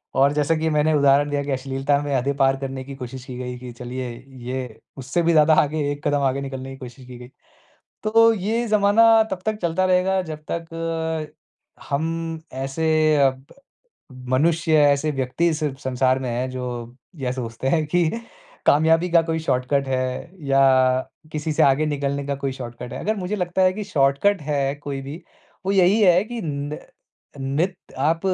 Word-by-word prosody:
और 140 +2 +4
जैसा 150 +2 +1
कि 160 0 0
मैंने 155 +1 +2
उदाहरण 145 0 +4
दिया 145 0 -1
कि 140 - -4
अश्लीलता 135 +2 0
में 145 -1 -3
हदें 135 +2 0
पार 135 -1 +3
करने 135 -1 -4
की 135 +1 -9
कोशिश 130 0 -8
की 125 -2 -8
गई 125 -1 -5
कि 125 -1 -8
चलिए, 125 +1 -6 0.2
ये 125 -3 -6 0.2
उससे 135 +7 -1
भी 170 - +3
ज़्यादा 155 0 +5
आगे 150 -1 -1
एक 145 +1 -4
कदम 145 -1 +1
आगे 135 +1 0
निकलने 135 -1 -6
की 135 - -9
कोशिश 125 0 -11
की 125 -1 -10
गई। 125 +1 -11 0.7
तो 225 +1 +5
ये 220 +4 -1
ज़माना 220 +2 +5
तब 190 - -2
तक 215 -1 0
चलता 170 +2 +1
रहेगा 185 +1 +2
जब 155 -3 -8
तक 165 -1 -3 0.6
हम 165 +2 -2
ऐसे 155 +3 +1
अ, 135 -2 +5
ब 130 +1 -15 0.8
मनुष्य, 160 +4 +2
ऐसे 145 +1 +3
व्यक्ति 135 +5 0
इस 155 -1 -2 0.2
संसार 130 0 +1
में 130 -2 -4
हैं, 125 +2 -2
जो 125 -1 -6 0.2
या 130 -3 -2
सोचते 125 0 -4
हैं 155 0 +1
कि 175 +1 +2 0.6
कामयाबी 160 +4 +4
का 170 -1 +6
कोई 165 0 -2
शॉर्टकट 135 -1 0
है 130 +4 -2 0.2
या 135 0 +4 0.7
किसी 155 +1 -2
से - - +2
आगे 140 +3 +4
निकलने 140 -1 -2
का 140 - -1
कोई 135 -1 -3
शॉर्टकट 120 -2 -8
है। - - -5
अगर 215 +1 -1
मुझे 195 +2 -3
लगता 180 0 0
है 185 0 +4
कि 210 +1 -5
शॉर्टकट 150 +2 +2
है 140 -1 -1
कोई 145 -1 -6
भी, 145 +6 -8 0.4
वो 195 - +2
यही 195 +3 +4
है 180 -1 +5
कि 240 +1 -6
न 145 0 -4 0.6
नित 145 +8 -1 0.2
आप, 160 +4 +1
145 Hz, 180 wpm, -22 LUFS, 135-165 Hz, 0.8 s, का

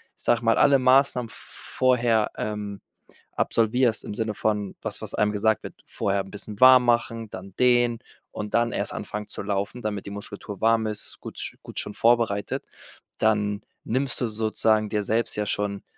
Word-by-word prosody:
ich - - -22
sage 120 -1 +2
mal, 115 - +4
alle 140 -1 +6
Maßnahmen 130 -2 +3
vorher, 120 -4 0
ähm, 105 -2 -4 0.5
absolvierst 115 0 +1
im - - -5
Sinne 110 0 -2
von 105 -2 -1
was, - - -5
was - - -6
einem 105 0 +2
gesagt 110 +1 +1
wird, - - -7
vorher 100 0 -1
'n 95 - -13
bisschen 105 0 -6
warm 130 -1 +8
machen, 115 -2 0
dann 95 0 -9
dehnen 120 -1 +3 0.3
und 105 -1 -6
dann 120 0 +2
erst - - -2
anfangen 105 0 -5
zu - - -6
laufen, 100 +4 -3
damit 105 -3 -3
die 100 - -7
Muskulatur 100 0 -8
warm 115 0 +3
ist, 105 -1 -5
gut - - -7
gut - - -6
schon 105 - -5
vorbereitet. 115 -4 +1 0.5
Dann 105 -2 +1 0.2
nimmst 130 +3 -1
du 120 - +1
sozusagen 110 0 +1
dir 105 0 0
selbst 115 +3 0
ja 105 0 -2
schon 100 -1 -2
110 Hz, 175 wpm, -25 LUFS, 105-120 Hz, 0.5 s, warm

